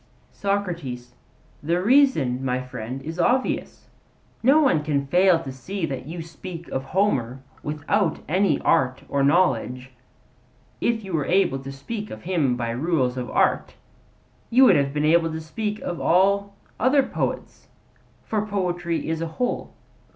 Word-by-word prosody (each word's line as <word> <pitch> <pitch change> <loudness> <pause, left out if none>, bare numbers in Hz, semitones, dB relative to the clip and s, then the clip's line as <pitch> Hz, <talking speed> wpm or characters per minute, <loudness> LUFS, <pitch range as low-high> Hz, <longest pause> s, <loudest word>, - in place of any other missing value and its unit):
SOCRATES: 170 -12 -3 0.5
The 170 +4 0
reason, 190 - +3
my 125 -1 0
friend, 130 0 -6
is 165 +3 -6
obvious. 250 +9 0 0.5
No 275 +6 +5
one 180 - +3
can 145 -2 0
fail 180 +4 +4
to 135 - -6
see 170 +8 -4
that 135 -3 -5
you 165 +1 -6
speak 170 +1 -9
of 135 0 -3
Homer 135 - 0 0.2
without 155 +6 0
any 180 -1 +2
art 130 -1 +2
or 140 -1 0
knowledge. 130 -5 +1 0.9
If 230 -2 0
you 190 -2 -7
were 150 -4 0
able 175 -7 +2
to 135 +1 -8
speak 205 +11 -6
of 110 - -9
him 160 -9 +1
by 120 -1 -2
rules 130 -1 0
of 125 -2 -4
art, - - +1 0.7
you 260 +3 +6
would - - +6
have 140 -1 +2
been 150 +1 0
able 165 +1 +3
to 160 - -4
speak 210 +7 -4
of 175 - -4
all 200 +3 +2 0.2
other 265 +3 +4
poets; - - -4 0.6
for 215 -2 -1
poetry 175 -4 -2
is 160 0 -2
a 165 - -1
whole. 250 - -2
165 Hz, 150 wpm, -24 LUFS, 135-195 Hz, 0.9 s, you